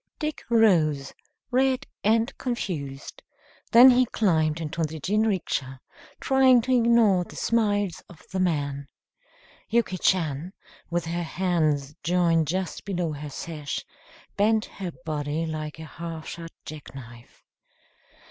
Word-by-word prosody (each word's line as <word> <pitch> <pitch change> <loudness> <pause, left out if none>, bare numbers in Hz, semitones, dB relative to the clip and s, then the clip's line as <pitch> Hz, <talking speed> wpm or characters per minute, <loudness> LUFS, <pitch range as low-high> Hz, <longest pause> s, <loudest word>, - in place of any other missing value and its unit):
Dick 305 -1 -3
rose, 160 - +3 0.4
red 260 0 +2 0.2
and 225 +5 +2
confused. 150 - -4 0.5
Then 250 +3 +9
he 250 0 +4
climbed 160 -8 +1
into 160 +1 -4
the 160 0 -2
jinrikisha, 185 -9 -1 0.4
trying 265 -2 +5
to 255 +2 +1
ignore 230 -6 +4
the - - -13
smiles 205 -6 0
of 175 - -15
the 190 - -2
man. 145 -6 -1 0.8
Yuki 220 -5 +1
Chan, 165 -1 0 0.4
with 175 -1 -1
her 170 +1 -2
hands 160 -5 0
joined 165 -1 +2
just 185 +3 -3
below 180 -5 -2
her 145 0 -7
sash, 150 0 -5 0.5
bent 215 +1 +2
her 185 -3 -6
body 150 +1 -2
like 155 -1 -5
a 160 - -8
half 165 0 -7
shut 165 -1 -7 0.2
jack 150 -3 -9
knife. 120 -2 -13
170 Hz, 125 wpm, -26 LUFS, 155-215 Hz, 0.8 s, Then